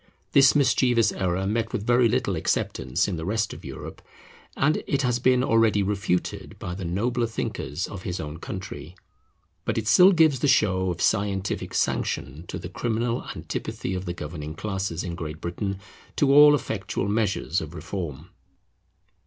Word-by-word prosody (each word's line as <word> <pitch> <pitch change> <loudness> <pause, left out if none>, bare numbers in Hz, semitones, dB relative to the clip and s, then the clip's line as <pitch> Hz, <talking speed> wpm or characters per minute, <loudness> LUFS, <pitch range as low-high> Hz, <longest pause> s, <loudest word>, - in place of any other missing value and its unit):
This 135 +1 +6
mischievous 125 -5 +3
error 95 0 -1
met 115 +2 -1
with 110 -4 -3
very 120 0 +4
little - - 0
acceptance 65 -1 0
in 85 - -2
the 80 - -5
rest 105 +4 -1
of - - -11
Europe, - - -8 0.6
and 155 +3 +2
it 140 0 0
has 125 -1 +1
been 125 0 +3
already 115 -4 +3
refuted 100 -2 -2
by 90 - -5
the 95 +1 -6
nobler 115 +8 0
thinkers 90 -6 -3
of 100 - -8
his 90 -1 -4
own 75 +1 -6
country; 95 -2 -7 0.7
but 115 - -2
it 110 -1 -2
still 185 - +7
gives 160 -7 +4
the 145 - +1
show 95 -8 +3
of 85 -1 -2
scientific 100 -2 0
sanction 75 +5 -1
to - - -5
the - - -7
criminal 115 +1 -2
antipathy 95 - -4
of 90 0 -4
the 85 - -3
governing 75 -1 -6
classes 95 -3 -3
in 90 - -4
Great 80 -3 -6
Britain 95 +3 -3 0.4
to 140 -1 +3
all 145 +1 +9
effectual 100 -6 -3
measures 100 -4 0
of 80 +1 -8
reform. 85 -3 -6
100 Hz, 165 wpm, -25 LUFS, 90-120 Hz, 0.7 s, all